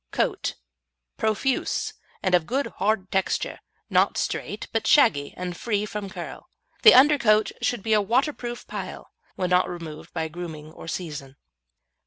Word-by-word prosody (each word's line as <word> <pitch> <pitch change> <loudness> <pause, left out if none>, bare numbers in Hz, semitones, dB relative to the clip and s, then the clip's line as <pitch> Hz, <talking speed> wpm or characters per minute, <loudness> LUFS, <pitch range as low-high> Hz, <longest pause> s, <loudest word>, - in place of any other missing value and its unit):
COAT - - -1 0.6
Profuse, 220 +5 0 0.3
and 185 - +1
of 175 -3 +3
good 270 +4 0
hard 195 -1 +1
texture, 190 -1 0 0.3
not - - +3
straight - - -3
but - - -1
shaggy 145 - +4
and 180 -1 -4
free 210 +1 -1
from 210 -2 -5
curl. - - -8 0.3
The 445 - +9
undercoat 235 -7 +5
should 240 -5 0
be 220 - +1
a 210 - +5
waterproof 240 +2 -1
pile, - - -7 0.2
when 180 -1 -2
not 180 0 +4
removed 165 -3 -8
by 160 -2 -2
grooming 160 -2 -8
or 165 - -11
season. 150 -6 -5
195 Hz, 145 wpm, -25 LUFS, 170-230 Hz, 0.6 s, The